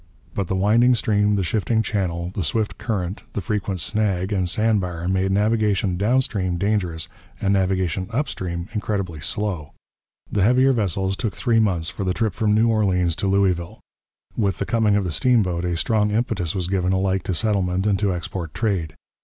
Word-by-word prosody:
But 100 -3 -2
the 95 - -1
winding 115 +6 +4
stream, 105 -2 +2
the 100 - 0
shifting 110 +4 0
channel, 90 -4 -2
the 100 - -2
swift 110 +7 -1
current, 105 -4 -3
the - - -2
frequent 100 -2 -2
snag 95 +1 0
and 95 -3 +1
sand 110 +1 +2
bar 85 -2 -4
made 95 +1 +1
navigation 105 -2 +1
down 115 +8 +2
stream 95 -7 -2
dangerous 90 -4 -1 0.3
and 100 0 +1
navigation 95 -2 0
upstream 95 - -3
incredibly 100 -7 -2
slow: 85 +1 -3 0.6
the 100 - +1
heavier 125 +6 +4
vessels 95 -3 0
took 105 -3 -3
three 115 -3 +2
months 90 -7 +1
for - - -5
the 90 -1 -1
trip 110 -4 0
from 105 +2 0
New 110 +2 +4
Orleans 95 -7 +2
to 100 - -1
Louisville. 95 -3 +1 0.6
With 100 -4 0
the - - -2
coming 110 -3 +2
of 105 - +2
the 90 - -2
steamboat 95 - +2
a 85 -1 -1
strong 105 +3 +1
impetus 105 -6 -1
was 90 -2 -1
given 95 -1 0
alike 95 0 +1
to 95 - -1
settlement 95 -2 0
and 100 -3 +2
to 100 -2 +1
export 85 -2 -5
trade. 95 -8 -1
95 Hz, 180 wpm, -22 LUFS, 90-110 Hz, 0.6 s, winding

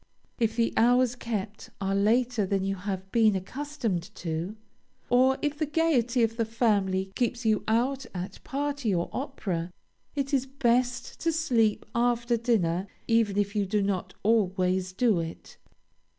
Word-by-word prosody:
If 225 -1 +1
the 230 -1 +1
hours 245 +1 +4
kept 220 -1 -5
are 195 -1 -1
later 230 +3 +2
than 195 0 0
you 195 0 0
have 190 0 -5
been 220 -3 +4
accustomed 230 - -3
to, 170 +4 -4 0.6
or 260 +2 +5
if 295 0 -1
the 310 - 0
gayety 270 -7 +2
of 225 0 0
the 230 - +2
family 200 -5 +1
keeps 240 +1 -1
you 215 -1 +2
out 255 +5 +1
at 185 +1 -6
party 280 -6 -1
or 170 - -2
opera, 195 - -3 0.4
it 275 -1 -2
is 270 -1 +2
best 250 -2 0
to 330 - +1
sleep 245 -10 +1
after 240 0 +1
dinner, 200 -6 +1 0.2
even 225 -4 +2
if 205 0 0
you 205 -2 +1
do 205 +1 +1
not 190 -2 -2
always 185 -4 +2
do 215 -1 +2
it. 165 0 -7
225 Hz, 150 wpm, -28 LUFS, 195-250 Hz, 0.6 s, or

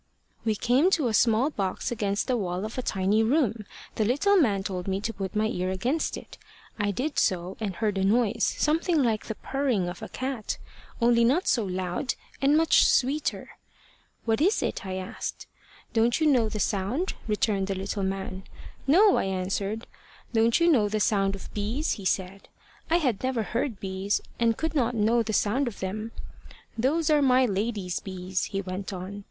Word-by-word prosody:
"We 220 -2 +1
came 250 - +3
to 275 -7 0
a - - -2
small 230 +6 +3
box 195 -4 -2
against 205 -3 -1
the 255 - +1
wall 185 -3 -2
of 220 - -6
a 255 - -2
tiny 195 -1 +1
room. 225 -4 +1 0.3
The 220 - +2
little 285 - +3
man 215 - +3
told 185 -2 -4
me 190 0 0
to 220 +3 -3
put 195 -1 -5
my 215 +1 +2
ear 185 -3 -1
against 245 +12 -1
it. - - -12 0.4
I 205 0 +1
did 260 +9 -1
so, 180 0 0
and 205 -4 -3
heard 210 -2 -1
a - - +1
noise 225 +2 +2
something 320 0 +2
like 220 -3 0
the 220 - -3
purring 255 -10 -1
of 175 0 -6
a - - -6
cat, 255 -4 -3 0.4
only 235 -1 +4
not 275 +10 +2
so 235 - +3
loud, 185 +6 -2 0.3
and 280 +2 +4
much 325 0 +5
sweeter. 275 +4 +1 0.8
`What 225 +2 +2
is 390 +7 +3
it?' - - -2
I 185 - -3
asked. 185 0 -5 0.5
`Don't 235 +3 +2
you 315 - +2
know 250 -7 +4
the 215 - -4
sound?' 205 - -1
returned 210 -2 0
the 195 - -2
little 195 +2 -3
man. 190 0 -3 0.5
`No,' 390 +7 +6
I - - 0
answered. 195 +3 -2 0.5
`Don't 230 +3 +3
you 335 - +4
know 215 -8 +3
the 215 +1 -1
sound 195 -1 +2
of 195 - -11
bees?' 220 +9 -1
he 200 - -4
said. 190 +1 -2 0.4
I 330 - +3
had 255 - 0
never 255 -3 0
heard 235 -1 -2
bees, 195 +1 -1 0.2
and 230 -1 +2
could 320 0 -2
not 245 -5 +1
know 225 +2 +3
the 220 -1 -2
sound 235 +6 +1
of 230 - -6
them. 215 +4 -4 0.7
`Those 310 +6 +2
are 295 - +4
my 260 -1 +4
lady's 200 -3 -2
bees,' 185 -1 -3
he 195 -1 -3
went 190 +1 -5
on. 190 +2 -6
220 Hz, 190 wpm, -27 LUFS, 195-255 Hz, 0.8 s, `No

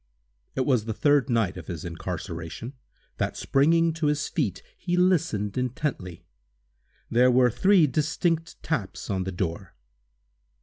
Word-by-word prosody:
It 130 - 0
was 125 -6 +2
the 110 -2 -3
third 145 0 +3
night 115 -6 +1
of - - -9
his 85 -4 -6
incarceration, 85 +6 -6 0.4
that, - - -2
springing 165 +4 +3
to 160 -2 -1
his 150 +1 0
feet, 130 - -2
he 175 -1 -2
listened 160 - +1
intently. 125 - -3 0.9
There 125 +2 +5
were 125 -1 +4
three 190 - +4
distinct 165 +4 -1
taps - - -3
on 95 -1 -1
the 95 - -3
door. 90 0 -4
125 Hz, 135 wpm, -26 LUFS, 100-155 Hz, 0.9 s, There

